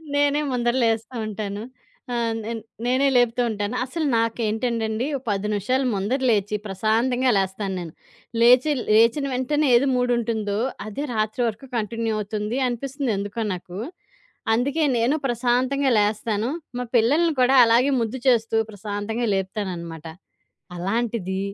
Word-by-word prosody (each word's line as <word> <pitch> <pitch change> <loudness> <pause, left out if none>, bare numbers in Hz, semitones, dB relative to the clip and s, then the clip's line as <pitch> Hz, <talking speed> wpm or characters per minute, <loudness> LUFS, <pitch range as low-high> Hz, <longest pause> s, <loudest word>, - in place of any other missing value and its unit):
నేనే 285 +1 +3
ముందర 240 -1 0
లేస్తా 225 +2 0
ఉంటాను. 205 0 -4 0.5
ఆ! - - -1 0.3
నేన్ 230 0 -3 0.3
నేనే 260 +3 +3
లేపుతూ 245 0 +2
ఉంటాను. 210 +2 -3
అసలు 310 +5 -3
నాకేంటంటండి, 225 0 -1
ఒక 260 - -14
10 200 +1 -1
నిమిషాలు 255 +7 0
ముందర 205 +7 -1
లేచి 210 -2 +1
ప్రశాంతంగా 230 +6 +1
లేస్తాను 190 +1 -1
నేను. 165 -3 -7 0.5
లేచి 250 +5 +6 0.2
లేచిన 230 +6 +4
వెంటనే 290 +4 +1
ఏది 270 +4 +4
మూడుంటుందో, 230 -4 0 0.3
అదే 275 +8 -4
రాత్రి 215 +3 -1
వరకు 230 +4 -5
కంటిన్యూ 225 +1 -2
అవుతుంది 210 +4 -3
అనిపిస్తుంది 260 0 -2
ఎందుకో 205 +3 -3
నాకు. 180 +1 -8 0.8
అందుకే 280 +7 0
నేనూ 240 +6 +2
ప్రశాంతంగా 255 +3 +1
లేస్తాను. 210 +2 0 0.3
మా 250 - -2
పిల్లలని 300 +9 +3
కూడా 255 +2 +4
అలాగే 240 +5 +4
ముద్దు 230 +3 -2
చేస్తూ 225 -2 +2 0.2
ప్రశాంతంగా 205 +3 -3
లేపుతాననమాట. 180 -4 -4 0.7
అలాంటిది 195 0 -2
230 Hz, 125 wpm, -23 LUFS, 210-250 Hz, 0.8 s, లేచి